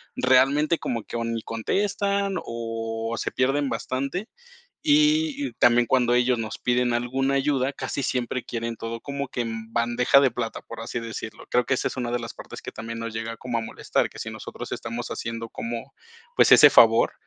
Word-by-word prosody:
realmente, 140 +5 +3
como 115 -3 -3
que - - -8
o 115 - -2
ni 115 -1 -2
contestan 200 - -1
o 115 0 -4
se - - -2
pierden 135 +2 +1
bastante. 140 - -3 0.6
Y 305 +1 +4 0.2
y - - -12
también 120 0 +4
cuando 120 -1 +3
ellos 125 0 +3
nos 110 -1 -4
piden 125 0 +1
alguna 135 +3 0
ayuda, 135 -1 +1
casi 140 - -4
siempre 125 0 -2
quieren 115 -1 -4
todo 115 +1 -5
como 140 +1 -4
que 125 - -4
"en 115 -1 -6
bandeja 120 +3 +4
de 135 -3 +4
plata", 115 -1 -4
por 115 - -9
así 120 +1 -4
decirlo. 110 -1 -7
Creo 125 0 +3
que 130 - +1
esa - - 0
es - - -9
una 120 -2 -2
de 120 - 0
las 115 - -7
partes - - -10
que - - -6
también 115 +1 -6
nos 115 -1 -4
llega 115 +1 -4
como 120 -2 -3
a - - -1
molestar, 115 - -1
que - - -14
si - - -4
nosotros - - -8
estamos 120 +1 -4
haciendo 115 0 -4
como, 120 +5 -6 0.4
pues - - +6
ese - - +9
favor, - - +6
120 Hz, 195 wpm, -25 LUFS, 115-135 Hz, 0.6 s, ese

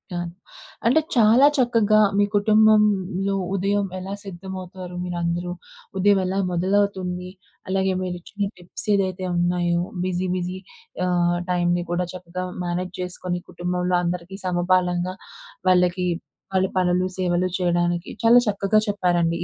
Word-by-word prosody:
అ! - - -2 0.7
అంటే 265 +7 +5 0.2
చాలా 235 +4 +6
చక్కగా 225 -4 +3 0.2
మీ 205 - +4
కుటుంబంలో 205 -2 +3 0.2
ఉదయం 200 +1 +1
ఎలా 190 +2 -5
సిద్ధమవుతారు, 185 -1 -8
మీరందరూ 175 0 -2 0.5
ఉదయం 200 +1 +4
ఎలా 190 +1 -2
మొదలవుతుంది, 185 0 0 0.4
అలాగే, 190 0 +1
మీరు 180 -1 -3
ఇచ్చిన 200 +2 -4
టిప్స్ 180 +4 -5
ఏదైతే 190 -2 0
ఉన్నాయో, 175 0 +1 0.2
బిజీ, 185 0 -1
బిజీ 180 +1 -3 0.5
ఆహ్, 175 -1 +2
టైంని 175 0 +1
కూడా 175 +1 0
చక్కగా 185 0 -6 0.2
మేనేజ్ 180 +1 -3
చేసుకొని, 180 0 -3
కుటుంబంలో 180 0 -1
అందరికీ 180 +2 -3
సమపాలంగా 180 0 +1 0.6
వాళ్ళకి 180 0 +3 0.5
వాళ్ళ 190 0 +3
పనులు, 180 0 +2
సేవలు 180 0 +1
చేయడానికి 175 0 0
చాలా 230 +2 +7
చక్కగా 205 +1 +2
చెప్పారండి. 175 -4 +1
185 Hz, 115 wpm, -23 LUFS, 175-195 Hz, 0.7 s, చాలా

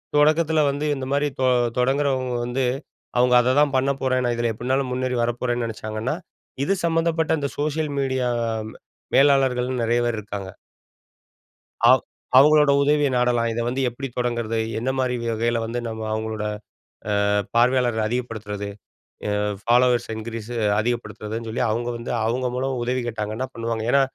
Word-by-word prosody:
தொடக்கத்தில 155 +2 +4
வந்து 145 +2 -3
இந்த 135 -1 -5
மாரி 145 +1 +2
தொ 130 - +3 0.3
தொடங்குறவங்க 130 0 +1
வந்து 125 +2 -1 0.5
அவங்க 125 0 +4
அததான் 135 +3 +3
பண்ணப்போறேன் 130 -1 +1
நான் 120 -1 0
இதில 120 0 0
எப்படினாலும் 130 +4 -1
முன்னேறி 130 0 -1
வரப்போறேன்னு 120 0 -1
நினைச்சாங்கன்னா, 110 +4 -3 0.5
இது 170 - +2
சம்மந்தப்பட்ட 165 -1 +1
இந்த 140 -1 -2
சோசியல் 150 0 -1
மீடியா 130 -2 0 0.8
மேலாளர்கள் 135 -3 +4
நிறைய 115 +1 +2
பேர் 120 -2 -1
இருக்காங்க. 100 -2 -6 1.4
ஆ. - - +8 0.5
அவங்களோட 150 +1 +6
உதவிய 145 0 +3
நாடலாம், 120 -1 +2
இதை 115 +1 -2
வந்து 130 +2 -1
எப்படி 130 +3 -6
தொடங்கிறது? 120 -2 -1 0.2
எந்த 125 +3 -1
மாரி 125 -1 +1 0.2
வகையில 115 +1 0
வந்து 115 +2 -3
நம்ம 110 -1 -5
அவங்களோட, 110 -1 -3 0.8
ஆ - - +2 0.3
பார்வையாளர்கள் 120 -2 +3
அதிகப்படுத்துறது? 110 -4 -4 0.6
எ - - 0 0.3
ஃபாலோவர்ஸ் 120 +1 +3
இன்கிரீஸ் 110 0 -6 0.3
அதிகப்படுத்துறதுன்னு 110 -1 -3
சொல்லி 110 - -2
அவங்க 120 +2 -1
வந்து 115 - -5
அவங்க 125 +3 0
மூலமா 130 +1 -1
உதவி 125 +1 -1
கேட்டாங்கனா 110 +2 -3
பண்ணுவாங்க 115 -1 -3
ஏன்னா, 140 - +5
125 Hz, 135 wpm, -23 LUFS, 115-135 Hz, 1.4 s, ஆ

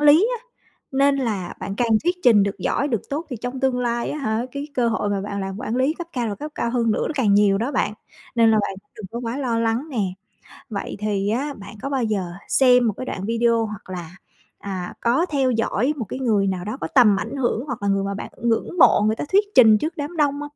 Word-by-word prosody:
lý 300 +9 +6
á. - - -28 0.5
Nên 275 +1 +4
là 215 -9 -2
bạn 195 - -4
càng 240 -1 +1 0.2
thuyết 355 +1 +1
trình 220 -5 +6
được 200 0 -2
giỏi, 280 +9 0
được 230 -6 0
tốt, 310 +4 -3
thì 250 - -3
trong 245 +4 -5
tương 260 -2 +1
lai 235 -1 -1
á 300 - -4
hả, 220 -4 -1
cái 285 +2 -5
cơ 240 -2 +2
hội 220 -2 -1
mà 200 -1 0
bạn 200 0 -4
làm 195 0 -4
quản 245 -2 -2
lý 270 +5 +2
cấp 345 0 -7
cao 240 -3 -1
và 205 - -3
cấp 300 +8 -7
cao 235 - -1
hơn 235 -2 +1
nữa, - - 0
nó - - -2
càng 220 -8 +3
nhiều 200 -1 +4
đó 250 +6 -2
bạn, 210 - 0 0.4
nên 230 -1 +5
là 220 - +4
bạn 195 - -2
cũng - - -45
đừng 210 -3 -7
có 235 - -5
quá 240 +3 -3
lo 240 -4 0
lắng 230 +6 0
nè. 245 - -3 0.7
Vậy 200 -1 -4
thì 205 -1 -1
á, 275 +6 -1
bạn 200 +1 -11
có 275 - -3
bao 265 -3 0
giờ 210 -4 0 0.2
xem 250 -2 +5
một 215 - +2
cái 255 - -6
đoạn 190 - -4
video 230 0 +2
hoặc 210 -3 -9
là, 175 -1 -7 0.4
à, 185 -3 -5
có 255 +10 +2
theo 275 -5 +1
dõi 230 +3 +1
một 235 - -3
cái - - -5
người 215 -6 +2
nào 185 -2 -2
đó 215 +5 -4
có - - -3
tầm 230 -7 +6
ảnh 230 +6 -5
hưởng, 245 -1 0
hoặc 245 -7 -5
là 200 - 0
người 195 0 +1
mà 200 0 -2
bạn - - -6
ngưỡng 235 +9 0
mộ 260 - +6
người 220 - +1
ta - - -3
thuyết 400 +2 +5
trình 220 -4 +7
trước 320 +8 -3
đám 300 +4 -5
đông 295 -3 +3
hông? 290 - -4
235 Hz, 265 wpm, -22 LUFS, 205-270 Hz, 0.7 s, trình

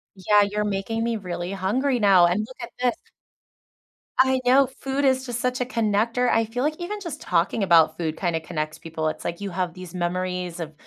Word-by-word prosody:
Yeah, 205 +2 +4
you're 210 +1 -1
making 210 +3 -2
me 235 -1 0
really 180 -2 -5
hungry 245 +8 0
now, 195 -4 +6
and 175 +4 +1
look 255 - -14
at 235 - -7
this. 250 -1 +1 1.2
I 260 0 +4
know 265 +2 +5
food 270 +2 -3
is 260 0 +2
just 240 -2 -3
such 250 0 -1
a - - +1
connector, 230 +1 +1
I 225 0 +3
feel 245 +4 -3
like 305 +1 0
even 415 +4 -4
just 340 -8 -7
talking 180 +4 +1
about 165 -3 +5
food 160 -2 -3
kinda 170 -3 0
connects 155 -2 -4
people, 160 -1 -4
it's 155 - -4
like, 170 - -4
you 200 - -3
have 180 -1 -2
these 185 -1 -10
memories 180 0 -2
of, 160 -2 -5
205 Hz, 205 wpm, -24 LUFS, 175-250 Hz, 1.2 s, now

